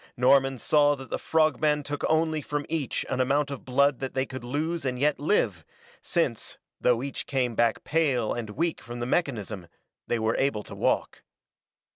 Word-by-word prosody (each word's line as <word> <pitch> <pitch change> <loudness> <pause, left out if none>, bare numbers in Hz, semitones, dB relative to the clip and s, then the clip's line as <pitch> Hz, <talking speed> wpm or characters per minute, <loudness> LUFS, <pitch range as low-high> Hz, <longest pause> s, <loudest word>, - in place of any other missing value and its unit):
Norman 135 +1 +4
saw 145 +3 +3
that 135 -1 -11
the - - -1
frog 155 -4 +2
men 150 -1 +2
took 145 0 -5
only 160 -1 +2
from 145 +1 -3
each 155 -6 -2
an 130 - 0
amount 140 +2 +1
of 140 - -6
blood 140 +1 +2
that 135 -1 -5
they 130 0 +1
could 130 -2 -8
lose 155 +7 -2
and 130 -2 -1
yet 145 +1 +2
live, 115 - +1 0.4
since, - - -1 0.2
though 125 0 +2
each 140 - -5
came 130 -4 0
back 115 0 +1
pale 140 -8 +1
and 115 -3 -4
weak 160 +6 -1
from 120 +1 -8
the 120 - -2
mechanism, 110 - -2 0.4
they 120 - +1
were 110 0 0
able 135 -6 0
to - - -10
walk. - - 0
135 Hz, 185 wpm, -27 LUFS, 120-150 Hz, 0.4 s, Norman